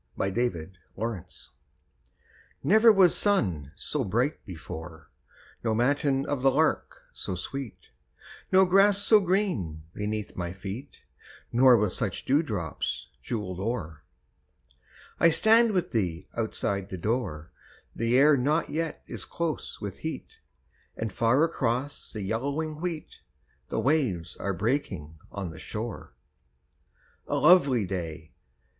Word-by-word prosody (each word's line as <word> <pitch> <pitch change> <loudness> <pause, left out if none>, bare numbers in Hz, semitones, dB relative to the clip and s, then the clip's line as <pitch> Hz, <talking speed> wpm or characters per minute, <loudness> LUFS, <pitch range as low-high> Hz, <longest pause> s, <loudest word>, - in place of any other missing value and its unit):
A 95 - +1
SUMMER 95 -8 -1 0.3
MORNING 110 -4 -3 1.4
Never 220 +3 +7
was 190 -4 +5
sun 90 - +1
so 150 +6 -2
bright 120 +8 0
before, 80 -2 -9 0.5
No 110 -2 +1
matin 135 +3 +1
of 145 -3 -2
the 135 - +5
lark 155 +4 0
so 95 - -4
sweet, 130 +6 -7 0.6
No 190 0 +6
grass 195 +2 +5
so 210 +1 +5
green 180 - -1
beneath 105 0 -4
my 85 -1 -4
feet, 100 +8 -8 0.5
Nor 125 0 +6
with 105 -3 0
such - - -3
dewdrops 105 - -1
jewelled 95 - -4
o'er. 95 -8 -3 1.2
I 170 - +6
stand 220 +7 +5
with 180 -4 -1
thee 90 -8 -1
outside 100 -3 -2
the 95 - -5
door, 90 -6 -2 0.4
The 115 +2 +2
air 145 +2 +6
not 145 +5 +1
yet 160 0 -3
is - - -6
close 170 -2 -4
with - - -6
heat, - - -6 0.6
And 110 -3 -3
far 115 - +3
across 135 -3 -1
the 105 - -5
yellowing 145 +9 -2
wheat 170 -3 -5 0.5
The - - -1
waves 125 - 0
are 100 - -2
breaking 95 - -2
on 95 -4 -5
the 80 - -11
shore. 110 +4 -6 1.1
A - - -1
lovely 140 - +5
day! 85 -4 -5
120 Hz, 125 wpm, -27 LUFS, 95-150 Hz, 1.4 s, Never